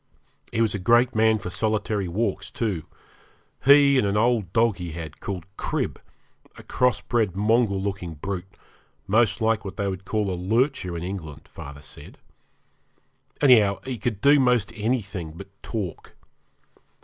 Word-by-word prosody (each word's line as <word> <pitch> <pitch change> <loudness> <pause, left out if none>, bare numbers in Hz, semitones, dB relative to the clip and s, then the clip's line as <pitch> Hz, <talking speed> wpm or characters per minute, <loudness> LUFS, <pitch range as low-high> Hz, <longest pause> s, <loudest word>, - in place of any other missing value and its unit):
He 115 - 0
was 115 - +2
a 100 - -2
great 120 +6 +4
man 110 0 +3
for 95 -3 -6
solitary 105 -1 -1
walks, 95 0 -2
too 100 -9 -3 0.8
he 140 0 +7
and 105 - +1
an 100 +1 0
old 110 -5 +1
dog 115 0 +2
he 90 -4 -6
had, 80 -2 -8
called 90 -4 -5
Crib, - - -2 0.6
a - - -11
cross 125 -4 +1
bred 110 -6 0
mongrel 105 0 +2
looking 95 -4 -4
brute, 95 +4 -5 0.6
most 110 +3 +2
like 110 -1 +1
what 95 -1 -7
they 100 -2 -1
call 100 +1 -2
a - - -1
lurcher 95 - 0
in 85 - -5
England, 80 -6 -7
father 70 +1 -10
said. - - -13 1.2
Anyhow, 110 -8 +5
he 130 -3 -4
could 110 -2 -3
do 145 +1 +6
most 120 -4 +2
anything 105 -8 -2
but 95 +4 -10
talk. 100 -7 -6
105 Hz, 150 wpm, -24 LUFS, 95-115 Hz, 1.2 s, he